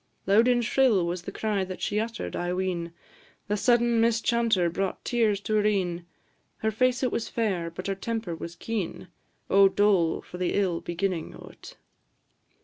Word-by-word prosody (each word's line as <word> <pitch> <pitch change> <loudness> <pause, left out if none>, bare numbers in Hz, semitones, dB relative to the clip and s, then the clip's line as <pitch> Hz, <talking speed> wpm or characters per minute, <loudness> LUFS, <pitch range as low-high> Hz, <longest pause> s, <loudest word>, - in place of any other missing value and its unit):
Loud 210 +5 +4
and 240 -1 +3
shrill 220 -7 +3
was 175 +1 -3
the 190 - -7
cry 210 -2 -1
that 185 0 -6
she 210 - -1
utter'd, 230 +1 -4
I 175 0 -2
ween; 180 -2 -2 0.6
The 210 - 0
sudden 235 +1 +3
mischanter 230 -4 +2
brought 190 +3 -3
tears 220 -5 +1
to 215 - -3
her 210 - +2
een; 175 -4 -1 0.5
Her 220 - -1
face 255 +3 +1
it 255 - +1
was 225 - -2
fair, 190 -7 -1
but 170 +2 -8
her 195 - 0
temper 205 -2 -4
was 170 +1 -8
keen; 205 -5 -4 0.4
O 195 0 +6
dole 195 -5 +2
for 180 - -10
the 180 - 0
ill 185 -4 0
beginnin' 175 -1 -3
o't! - - -13
200 Hz, 170 wpm, -27 LUFS, 180-225 Hz, 0.6 s, O